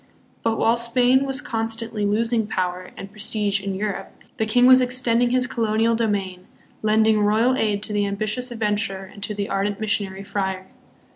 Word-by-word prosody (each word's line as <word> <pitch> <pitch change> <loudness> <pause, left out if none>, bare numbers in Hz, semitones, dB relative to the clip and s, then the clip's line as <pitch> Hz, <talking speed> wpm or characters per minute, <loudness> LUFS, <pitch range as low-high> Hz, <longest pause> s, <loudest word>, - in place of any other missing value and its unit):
But 225 -1 0
while 230 +1 +3
Spain 245 +3 +3
was 270 -1 -2
constantly 225 -1 -3
losing 225 +1 +1
power 185 -2 -3
and 195 - -8
prestige 210 -1 -1
in 195 -1 -3
Europe, 205 0 -4 0.2
the 220 - 0
king 245 +3 +4
was 255 0 +8
extending 245 -1 +2
his 250 0 +1
colonial 225 -1 +1
domain, 200 -5 -2 0.3
lending 220 0 +3
royal 220 +5 +3
aid 210 -4 0
to 215 - -1
the 205 -1 +1
ambitious 215 +5 -2
adventurer 210 -4 -2
and 200 - -13
to 210 +1 -3
the 200 0 -3
ardent 200 +1 -1
mis 220 -1 -2
sionary 195 -1 -2
friar. 190 -2 -3
215 Hz, 170 wpm, -22 LUFS, 200-230 Hz, 0.3 s, was